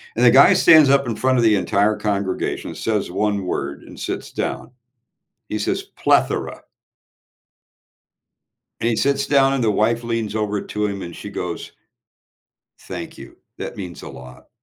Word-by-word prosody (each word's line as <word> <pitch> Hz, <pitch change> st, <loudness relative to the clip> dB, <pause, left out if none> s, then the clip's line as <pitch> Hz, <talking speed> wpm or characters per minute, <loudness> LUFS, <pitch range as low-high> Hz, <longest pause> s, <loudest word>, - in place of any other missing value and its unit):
and 120 Hz, -, +1 dB
the -, -, +8 dB
guy 135 Hz, +2 st, +7 dB
stands 155 Hz, -4 st, +6 dB
up 140 Hz, -2 st, +3 dB
in 115 Hz, -, -2 dB
front 130 Hz, +1 st, +1 dB
of -, -, +2 dB
the 110 Hz, -2 st, +5 dB
entire 105 Hz, +2 st, +1 dB
congregation, 100 Hz, -3 st, -3 dB
says 110 Hz, -4 st, -2 dB
1 100 Hz, 0 st, -1 dB
word, 70 Hz, -4 st, -4 dB
and -, -, -13 dB
sits -, -, -5 dB
down. -, -, -4 dB, 0.8 s
He 105 Hz, -, -2 dB
says 105 Hz, -, -1 dB
"Plethora." -, -, 0 dB, 2.2 s
And 115 Hz, -, +1 dB
he 115 Hz, -, 0 dB
sits 140 Hz, +3 st, +1 dB
down 135 Hz, -1 st, +4 dB
and 135 Hz, -3 st, 0 dB
the 110 Hz, -, +2 dB
wife 115 Hz, +3 st, +1 dB
leans 115 Hz, -2 st, -3 dB
over 105 Hz, -2 st, -1 dB
to 105 Hz, 0 st, -2 dB
him 100 Hz, -2 st, -5 dB
and 85 Hz, -, -7 dB
she 105 Hz, -, -8 dB
goes 90 Hz, -3 st, -5 dB, 1.1 s
"Thank -, -, -8 dB
you, -, -, -12 dB, 0.2 s
that -, -, -6 dB
means 90 Hz, -4 st, -7 dB
a -, -, -8 dB
lot." 65 Hz, -1 st, -13 dB
105 Hz, 165 wpm, -21 LUFS, 100-120 Hz, 2.2 s, the